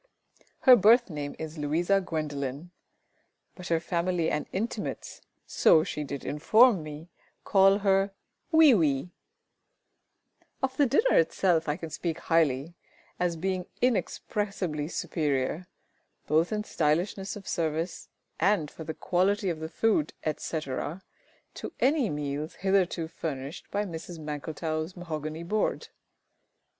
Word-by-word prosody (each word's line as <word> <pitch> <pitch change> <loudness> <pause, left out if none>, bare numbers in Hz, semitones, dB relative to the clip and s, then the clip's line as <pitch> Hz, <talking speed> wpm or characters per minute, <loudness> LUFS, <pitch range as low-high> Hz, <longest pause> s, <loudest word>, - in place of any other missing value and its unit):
Her 255 - +9
birth 230 0 +5
name 145 -2 -5
is 160 0 -7
LOUISA 170 +7 +1
GWENDOLEN; 150 -1 -4 0.8
but 180 - -9
her 165 -1 +2
family 170 0 0
and 150 - -2
intimates, 220 +6 -4 0.2
so 155 - +4
she 150 - -4
did 140 -1 -6
inform 215 - +4
me, 155 +2 -9 0.3
call 195 0 +5
her 195 0 +3 0.4
"WEE 320 -4 +7
WEE." 155 -4 +1 1.5
Of 265 0 0
the 285 0 +3
dinner 435 - +4
itself 165 -1 +2
I 150 - 0
can 165 -3 -7
speak 165 0 -3
highly, 160 -3 +1 0.5
as 175 -1 0
being 185 +2 -2
inexpressibly 195 -9 -1
superior, 155 0 -2 0.6
both 160 +5 +2
in 210 -1 -1
stylishness 180 +3 -1
of 200 -2 -10
service 165 +1 -2 0.3
and 170 -5 +2
for 160 - -9
the 160 0 -5
quality 195 +2 +1
of 160 - -5
the 160 0 -5
food, 175 -5 +1
etc., 155 +2 -3 0.5
to - - -7
any 270 -4 +2
meals 145 +1 -4
hitherto 185 -4 +1
furnished 140 -3 -6
by 205 +1 -1
Mrs 170 -1 -7
MANKLETOW'S 155 +2 -4
mahogany 155 -2 -5
board. 210 +5 -1
165 Hz, 125 wpm, -28 LUFS, 155-195 Hz, 1.5 s, Her